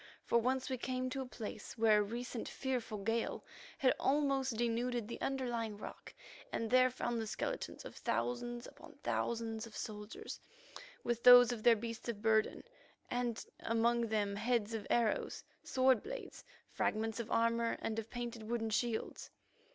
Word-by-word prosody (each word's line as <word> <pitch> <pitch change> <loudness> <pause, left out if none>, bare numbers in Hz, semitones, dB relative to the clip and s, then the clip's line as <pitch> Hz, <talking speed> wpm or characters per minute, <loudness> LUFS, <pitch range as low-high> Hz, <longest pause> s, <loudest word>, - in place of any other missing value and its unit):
For 235 - +3
once 255 +2 0
we 260 -3 -2
came 255 0 -2
to 270 - -2
a 260 - -5
place 215 -3 -7
where 220 -2 +5
a - - +4
recent 235 +3 -4
fearful 250 -5 -2
gale 225 +3 -1 0.3
had 260 - +4
almost 270 -3 +2
denuded 240 0 0
the 235 - -6
underlying 240 -5 -1
rock, - - -9 0.4
and 225 0 -2
there 255 0 +6
found 240 -2 -2
the 220 - -4
skeletons - - -4
of - - -8
thousands 240 0 -2
upon - - -13
thousands 225 -1 -1
of 220 - -10
soldiers, 210 0 -6 0.6
with 240 -1 -1
those 245 -1 +10
of 235 -3 -3
their 235 +1 +7
beasts 230 +2 -5
of 220 -3 -3
burden, 220 0 +2 0.5
and 245 -2 -1
among 230 +1 +2
them 205 -2 0
heads 230 0 0
of 220 -2 -4
arrows, 230 -3 +1 0.2
sword 260 -3 +3
blades, - - -7 0.3
fragments 225 +1 -1
of 235 -1 -4
armour 230 0 +2
and 225 0 -2
of 225 0 -6
painted 240 -1 -5
wooden 225 -2 -1
shields. 230 +1 -1
235 Hz, 160 wpm, -36 LUFS, 225-245 Hz, 0.6 s, those